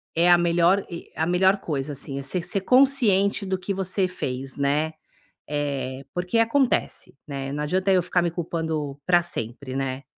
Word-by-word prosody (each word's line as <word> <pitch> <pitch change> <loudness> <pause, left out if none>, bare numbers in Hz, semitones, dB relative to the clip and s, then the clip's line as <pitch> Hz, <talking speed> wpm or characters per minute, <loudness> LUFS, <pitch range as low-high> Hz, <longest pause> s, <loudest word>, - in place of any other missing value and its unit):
é 170 +2 +4
a 175 - +8
melhor 175 +3 +3
e 170 -2 -8
a 160 - 0
melhor 190 +3 +3
coisa 145 -4 -3
assim, 135 0 -5
é - - -6
você 155 +6 -1
ser 195 +3 -1
consciente 225 -6 +3
do 190 0 -1
que 185 - -4
você 190 0 0
fez, 135 -7 -5
né, 145 +3 +1 0.6
eh, 140 -2 -3
porque 180 +5 -1
acontece, 245 - +1
né, 135 -2 -4
não 150 +1 -3
adianta 185 +5 +1
eu 185 -2 +4
ficar 180 0 +1
me 170 - +1
culpando 160 -4 -3
para 175 -1 +5
sempre, 130 -3 -5
né. 135 0 -3
170 Hz, 175 wpm, -24 LUFS, 140-190 Hz, 0.6 s, a